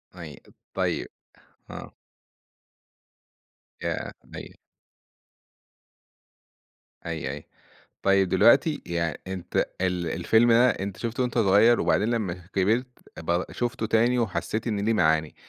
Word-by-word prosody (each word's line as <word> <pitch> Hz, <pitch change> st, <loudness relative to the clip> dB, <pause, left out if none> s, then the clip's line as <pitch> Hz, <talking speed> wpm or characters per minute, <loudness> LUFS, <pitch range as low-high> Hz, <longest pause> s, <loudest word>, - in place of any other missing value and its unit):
أيوه، 80 Hz, -5 st, -9 dB, 0.4 s
طيب، -, -, -1 dB, 0.6 s
أه. -, -, -9 dB, 1.9 s
ياه! -, -, -3 dB
مي -, -, -10 dB, 2.5 s
أيوه، 80 Hz, -5 st, -4 dB
أيوه. 70 Hz, -, -8 dB, 0.6 s
طيب 95 Hz, -1 st, +3 dB
دلوقتي، 135 Hz, -, +4 dB
يعني، 85 Hz, -3 st, -2 dB
أنت 95 Hz, -2 st, -6 dB, 0.2 s
ال 90 Hz, -2 st, -1 dB
الفيلم 115 Hz, +8 st, +3 dB
ده 120 Hz, +2 st, +5 dB
أنت 100 Hz, -3 st, -4 dB
شُفته 120 Hz, +2 st, -3 dB
وأنت 125 Hz, -1 st, -2 dB
صغير، 110 Hz, +3 st, +5 dB
وبعدين 105 Hz, -, +1 dB
لمّا 110 Hz, -7 st, -1 dB, 0.2 s
كبرت 110 Hz, +7 st, +1 dB, 0.3 s
ب 85 Hz, +2 st, -1 dB
شُفته 120 Hz, -2 st, -2 dB
تاني 120 Hz, +3 st, +2 dB
وحسيت 110 Hz, +1 st, -2 dB
إن 105 Hz, -2 st, -1 dB
له 115 Hz, -, +3 dB
معاني. 80 Hz, -5 st, +1 dB
100 Hz, 110 wpm, -25 LUFS, 85-115 Hz, 2.5 s, ده